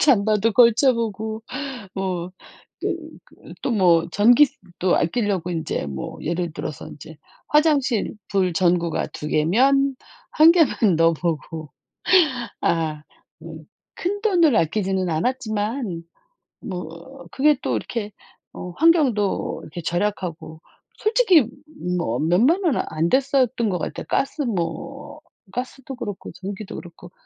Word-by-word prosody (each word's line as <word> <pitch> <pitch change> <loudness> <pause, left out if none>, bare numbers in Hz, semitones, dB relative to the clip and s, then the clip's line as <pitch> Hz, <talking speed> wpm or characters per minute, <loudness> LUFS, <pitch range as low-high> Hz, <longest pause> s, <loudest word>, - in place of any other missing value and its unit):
잠바도 215 -4 +3
걸쳐 245 +3 +5
보고 220 -1 -3 0.5
뭐 185 -2 -3 0.5
또 - - -1 0.4
그 - - -15
또 260 - 0
뭐 175 -5 +4
전기세도 215 - +3
아끼려고 185 -1 0
인제 160 - -3
뭐 65 -1 -6
예를 170 0 -2
들어서 150 - -6
인제 150 +2 -12 0.3
화장실 295 -8 +2
불 185 -3 +1
전구가 170 -1 +1
2 150 - -7
개면 265 - +3 0.4
1 320 +1 +9
개만 335 -5 +3 0.2
넣어 165 0 +4
보고. 160 -1 -4 0.9
아 155 -3 0 0.4
음 160 -2 -10 0.3
큰돈을 365 - +2
아끼지는 190 +1 0
않았지만 215 - -2 0.6
뭐 180 +9 -8
그게 295 +1 +3
또 - - 0
이렇게 215 -3 -4 0.4
어 180 - -7
환경도 270 - +2
이렇게 165 +3 -8
절약하고 175 -3 -3 0.4
솔직히 405 - +4 0.5
뭐 120 -7 -1
몇만 235 - +3
원은 315 -7 +2
안 160 +2 0
됐었던 260 -3 +2
것 180 - -1
같아요. - - -5
가스 280 +2 0
뭐 235 - -4 0.3
가스도 260 +1 -6
그렇고 205 -6 -6
전기도 195 +1 -7
그렇고. 175 +1 -12
205 Hz, 235 characters per minute, -22 LUFS, 170-265 Hz, 0.9 s, 1